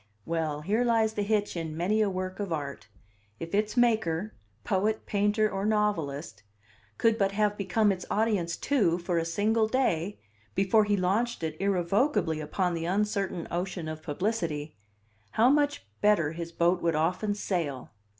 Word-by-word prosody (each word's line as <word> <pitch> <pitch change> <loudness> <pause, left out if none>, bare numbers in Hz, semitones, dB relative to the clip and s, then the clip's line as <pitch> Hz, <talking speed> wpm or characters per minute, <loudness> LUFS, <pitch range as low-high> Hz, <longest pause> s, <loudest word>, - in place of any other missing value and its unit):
Well, 155 -2 -2
here 210 +9 +1
lies 225 -2 +2
the 210 - -2
hitch 205 -1 0
in 160 -2 -4
many 205 +6 +1
a 210 - +2
work 185 0 -4
of 200 -3 -3
art: 140 -8 -4 0.5
if 165 +2 -7
its 210 +3 0
maker 215 -5 +2 0.3
poet, 210 +2 0
painter, 210 +1 +2
or 195 -2 -3
novelist 165 - -1 0.6
could 225 0 +2
but 195 -1 +2
have 210 0 +1
become 205 +2 +2
its 185 -2 -3
audience 205 -6 0
too, 210 -12 +2
for 175 -1 -1
a 165 - -1
single 215 +6 +1
day, 205 -7 0 0.4
before 205 +3 +4
he 205 -1 +1
launched 200 +3 0
it 160 -1 -2
irrevocably 195 - +1
upon 180 +4 -1
the 165 -1 -3
uncertain 195 -2 -1
ocean 175 -1 -3
of 155 0 -5
publicity, 160 -3 -2 0.6
how 235 +4 +5
much 290 0 +1 0.2
better 205 -8 +3
his 170 0 -6
boat 175 +2 +2
would 165 -2 +1
often 180 +6 0
sail! 165 -10 -3
195 Hz, 160 wpm, -28 LUFS, 165-215 Hz, 0.6 s, how